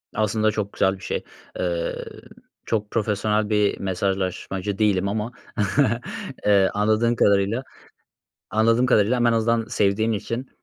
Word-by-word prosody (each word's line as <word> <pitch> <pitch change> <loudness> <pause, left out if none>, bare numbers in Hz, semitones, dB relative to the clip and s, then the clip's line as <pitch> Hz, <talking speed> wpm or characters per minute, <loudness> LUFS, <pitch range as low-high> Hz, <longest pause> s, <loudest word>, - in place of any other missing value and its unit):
Aslında 110 0 +1
çok 105 -2 -3
güzel 95 0 +2
bir - - -15
şey. - - -3 0.4
Iıı, 85 -2 -2 0.6
çok 105 -2 -2
profesyonel 105 -1 0
bir 105 -1 +1
mesajlaşmacı 95 +1 -2
değilim 100 -3 +2
ama, 105 +3 -2 1.2
ııı, 100 -2 +5
anladığın 110 +3 +2
kadarıyla 100 +4 +2 0.9
anladığım 115 +4 +3
kadarıyla 120 0 +3
ama 120 0 +3
en - - +2
azından 115 0 +1
sevdiğin 105 +2 +1
için, 115 +4 -4
105 Hz, 125 wpm, -23 LUFS, 100-115 Hz, 1.2 s, ııı